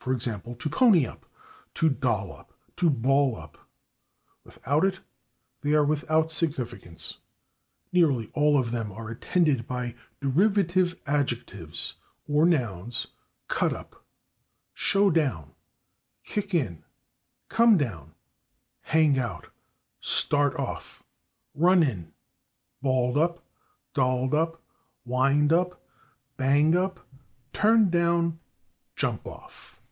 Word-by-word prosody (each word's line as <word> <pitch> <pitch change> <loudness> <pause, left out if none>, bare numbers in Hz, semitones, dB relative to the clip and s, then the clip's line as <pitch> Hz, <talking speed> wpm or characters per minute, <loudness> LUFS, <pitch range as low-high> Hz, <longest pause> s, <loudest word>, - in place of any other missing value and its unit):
g./, - - -13
/to 120 +2 -3
pony 180 - +5
up/, - - -11 0.5
/to 160 - +3
doll 105 -8 -1
up/, - - -18 0.2
/to 175 -1 +2
ball 135 0 +2
up/; - - -12 0.9
without 145 +6 -1
it 190 0 +1 0.6
they 145 +1 +1
are 150 -1 +4
without 155 +2 +1
significance. 135 - -3 0.7
Nearly 145 -11 +2
all 150 -1 +3
of 120 -4 0
them 115 -3 -3
are 110 +2 -8
attended 135 0 0
by 125 -1 -3 0.3
derivative 180 +4 +2
adjectives 120 - -3 0.3
or 150 +3 +3
nouns; 115 - -1 0.4
/cut - - 0
up/, - - -11 0.7
/show 200 -2 +2
down/, 130 - 0 0.7
/kick 200 -3 -3
in/, 105 - -1 0.6
/come 230 -2 +5
down/, 85 - -4 0.7
/hang 155 -4 +4
out/, 110 -10 -5 0.5
/start 145 -1 +1
off/, - - -6 0.5
/run 175 +1 +4
in/, 90 -10 -5 0.7
/balled 130 +1 +2
up/, 170 +1 -1 0.5
/dolled 130 -1 +1
up/, 165 +2 0 0.5
/wind 140 +4 +2
up/, 180 +1 +1 0.6
/bang 145 +5 +3
up/, 185 +1 -2 0.5
/turn 215 -2 +4
down/, 170 -1 +1 0.6
/jump - - -2
off - - -13
145 Hz, 105 wpm, -26 LUFS, 120-170 Hz, 0.9 s, pony